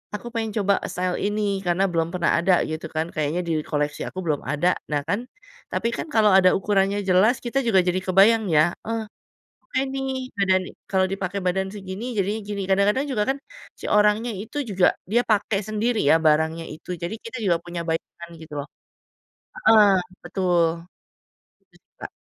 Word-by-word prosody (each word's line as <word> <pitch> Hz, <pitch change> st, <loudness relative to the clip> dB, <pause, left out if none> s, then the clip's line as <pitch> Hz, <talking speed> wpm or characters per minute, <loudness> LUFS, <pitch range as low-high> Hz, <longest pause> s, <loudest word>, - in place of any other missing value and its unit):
aku 240 Hz, -, -7 dB
pengen 225 Hz, -2 st, -2 dB
coba 200 Hz, +1 st, +3 dB, 0.2 s
style 180 Hz, 0 st, -1 dB
ini, 205 Hz, -1 st, 0 dB
karena 175 Hz, +3 st, +2 dB
belum 165 Hz, -1 st, 0 dB
pernah 170 Hz, -1 st, +1 dB
ada 185 Hz, +2 st, +3 dB
gitu 160 Hz, +1 st, -5 dB
kan, 160 Hz, +1 st, 0 dB
kayaknya 155 Hz, +3 st, -1 dB
di 165 Hz, -, 0 dB
koleksi 150 Hz, 0 st, -2 dB
aku 185 Hz, -, -7 dB
belum 150 Hz, -3 st, 0 dB
ada. 150 Hz, +6 st, +1 dB, 0.2 s
Nah 145 Hz, -1 st, +1 dB
kan, 200 Hz, +5 st, 0 dB, 0.5 s
tapi 230 Hz, -, 0 dB
kan -, -, -5 dB
kalau 215 Hz, -4 st, +4 dB
ada 185 Hz, -1 st, +6 dB
ukurannya 195 Hz, 0 st, +1 dB
jelas, 195 Hz, +7 st, +4 dB
kita 255 Hz, +3 st, 0 dB
juga 195 Hz, -4 st, +5 dB
jadi 180 Hz, +1 st, +1 dB
kebayang 205 Hz, +4 st, +4 dB
ya, 155 Hz, +2 st, +4 dB, 0.2 s
eh 225 Hz, -1 st, -2 dB, 0.7 s
oke -, -, +2 dB
nih, 270 Hz, 0 st, -2 dB, 0.3 s
badan 190 Hz, -1 st, +3 dB
ni -, -, -9 dB, 0.2 s
kalau 190 Hz, -1 st, +2 dB
dipakai 195 Hz, 0 st, -3 dB
badan 190 Hz, +1 st, 0 dB
segini, 195 Hz, +2 st, -6 dB
jadinya 205 Hz, +3 st, 0 dB
gini. 200 Hz, -1 st, -3 dB
Kadang-kadang 205 Hz, +8 st, +2 dB
juga 210 Hz, -4 st, +1 dB
kan, -, -, -9 dB, 0.4 s
si -, -, -8 dB
orangnya 210 Hz, +3 st, +3 dB
itu 210 Hz, +7 st, -7 dB
juga 190 Hz, -3 st, +2 dB, 0.3 s
dia 240 Hz, +2 st, +4 dB
pakai 205 Hz, -1 st, +1 dB
sendiri 220 Hz, +2 st, 0 dB
ya, -, -, +7 dB
barangnya 160 Hz, +2 st, +2 dB
itu. 155 Hz, +3 st, -14 dB
Jadi 190 Hz, +6 st, -3 dB
kita 230 Hz, +2 st, -7 dB
juga 175 Hz, -3 st, +3 dB
punya 175 Hz, -1 st, -5 dB
bayangan 170 Hz, +1 st, -4 dB
gitu 155 Hz, -2 st, -11 dB
loh. 145 Hz, -, -9 dB, 0.9 s
Heeh, 220 Hz, -, +6 dB, 0.3 s
betul, 180 Hz, -3 st, +1 dB, 1.1 s
terus -, -, -25 dB, 0.2 s
Kak -, -, -5 dB
190 Hz, 175 wpm, -23 LUFS, 170-210 Hz, 1.1 s, ya